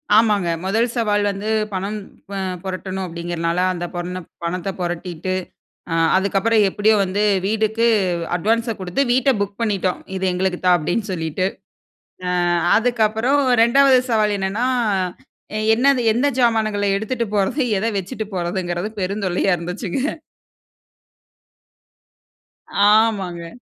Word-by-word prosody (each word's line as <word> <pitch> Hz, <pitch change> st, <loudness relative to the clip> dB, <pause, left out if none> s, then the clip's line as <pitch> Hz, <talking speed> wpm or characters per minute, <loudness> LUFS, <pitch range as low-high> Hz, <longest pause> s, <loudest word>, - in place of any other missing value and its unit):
ஆமாங்க. 210 Hz, -5 st, +3 dB, 0.2 s
முதல் 225 Hz, +5 st, +2 dB
சவால் 210 Hz, -3 st, +1 dB
வந்து 200 Hz, +2 st, -5 dB, 0.2 s
பணம் 200 Hz, +3 st, -3 dB, 0.3 s
ப -, -, -5 dB, 0.3 s
புரட்டணும் 190 Hz, 0 st, -4 dB
அப்டீங்கிறனால, 170 Hz, 0 st, -3 dB
அந்த 175 Hz, 0 st, -4 dB
பொண்ண 180 Hz, +1 st, -4 dB, 0.3 s
பணத்த 180 Hz, +2 st, -2 dB
பொரட்டிட்டு, 175 Hz, +1 st, -3 dB, 0.8 s
அதுக்கப்பறம் 200 Hz, +3 st, +2 dB
எப்புடியோ 210 Hz, +2 st, +2 dB
வந்து 195 Hz, +3 st, -1 dB, 0.2 s
வீடுக்கு 220 Hz, +2 st, +1 dB, 0.5 s
அட்வான்ஸ 225 Hz, +4 st, 0 dB
குடுத்து 185 Hz, +9 st, -1 dB
வீட்டை 260 Hz, +2 st, +3 dB
புக் 200 Hz, +1 st, -3 dB
பண்ணிட்டோம். 195 Hz, -5 st, 0 dB, 0.2 s
"இது 190 Hz, -, -2 dB
எங்களுக்கு 180 Hz, 0 st, -1 dB
தான்", 180 Hz, -1 st, +6 dB
அப்டீன்னு 195 Hz, +6 st, -2 dB
சொல்லிட்டு. 165 Hz, +2 st, -1 dB, 1.0 s
அ -, -, +1 dB, 0.3 s
அதுக்கப்பறம் 235 Hz, +4 st, +2 dB, 0.2 s
2வது 265 Hz, +2 st, +5 dB
சவால் 210 Hz, -2 st, +2 dB
என்னன்னா, 195 Hz, +5 st, -1 dB, 1.1 s
என்னது 265 Hz, +1 st, +3 dB
"எந்த 260 Hz, +5 st, +2 dB
சாமான்கள 215 Hz, -4 st, +2 dB
எடுத்துட்டு 230 Hz, +2 st, -2 dB
போறது? 205 Hz, +9 st, +1 dB, 0.2 s
எத 220 Hz, -, -2 dB
வச்சுட்டு 215 Hz, +3 st, -5 dB
போறதுங்குறது?" 175 Hz, +2 st, -2 dB
பெருந்தொல்லையா 195 Hz, -1 st, 0 dB
இருந்துச்சுங்க. 195 Hz, -, -3 dB, 2.7 s
ஆமாங்க. 195 Hz, -6 st, +2 dB
200 Hz, 105 wpm, -20 LUFS, 180-225 Hz, 2.7 s, தான்